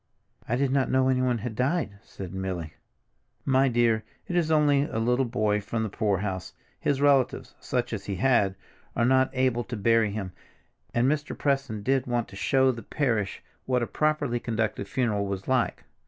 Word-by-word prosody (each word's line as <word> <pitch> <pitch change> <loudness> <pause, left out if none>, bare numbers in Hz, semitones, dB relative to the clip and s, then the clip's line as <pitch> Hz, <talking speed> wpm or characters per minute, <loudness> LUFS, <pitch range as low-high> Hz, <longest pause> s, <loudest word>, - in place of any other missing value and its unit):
"I 120 - +2
did 135 +1 +1
not 135 -1 +2
know 130 0 +3
anyone 130 -2 +2
had 115 0 -5
died," 125 - -1
said 95 -2 -9
Milly. 95 -4 -4 0.7
"My 135 0 +4
dear, 115 -3 +2 0.2
it's 175 -3 0
only 150 -3 +4
a 115 - -5
little 125 +3 +2
boy 105 -3 0
from 110 +2 -2
the 110 - -2
poorhouse. 100 -3 -2 0.3
His 140 - 0
relatives—such 130 -3 +1
as 100 -3 -4
he 100 - -3
had—are 115 0 0
not 130 +1 +4
able 130 -2 +1
to 120 - -5
bury 115 +1 +3
him, 100 -3 -4 0.6
and 120 +2 +2
Mr. 145 +1 -1
Preston 135 -7 -1
did 130 0 +1
want 120 -2 0
to - - -12
show 130 +5 +3
the 115 -2 -7
parish 115 -5 -1 0.2
what 125 -2 +2
a - - +1
properly 150 -3 0
conducted 110 -4 -2
funeral 105 -4 0
was 100 0 -4
like. 130 -2 0
120 Hz, 170 wpm, -27 LUFS, 105-130 Hz, 0.7 s, My